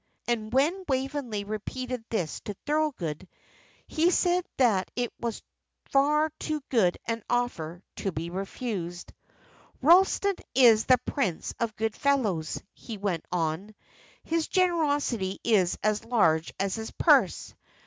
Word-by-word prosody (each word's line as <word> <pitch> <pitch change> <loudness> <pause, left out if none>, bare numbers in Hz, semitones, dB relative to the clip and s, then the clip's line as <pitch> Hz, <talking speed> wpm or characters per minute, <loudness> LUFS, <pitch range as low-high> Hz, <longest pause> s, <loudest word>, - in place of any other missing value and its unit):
And 220 -2 -1
when 310 +9 +2
Waveney 265 -5 -2
repeated 245 +4 -5
this 180 -9 -2
to 205 - -5
Thorold, 260 - -1 0.6
he 330 +2 +2
said 360 0 +2
that 215 -8 +3
it 245 -1 -2
was 235 -2 -4 0.5
far 300 +3 +3
too 305 -2 -3
good 200 -9 +3
an 230 0 -2
offer 180 -8 -2
to 195 - -2
be 165 +1 -5
refused. 190 -2 -5 0.7
"Ralston 380 +5 +4 0.2
is 230 -4 +6
the 255 - +6
prince 230 - -2
of 230 -2 -1
good 220 0 -2
fellows," 220 - 0
he 225 -3 -8
went 195 -5 -2
on. 175 +4 -2 0.5
"His 325 -1 -1
generosity 290 - +1
is 200 -6 +3
as 215 0 +1
large 165 -9 +2
as 195 0 0
his 220 0 -4
purse. - - +3
230 Hz, 130 wpm, -27 LUFS, 190-280 Hz, 0.7 s, is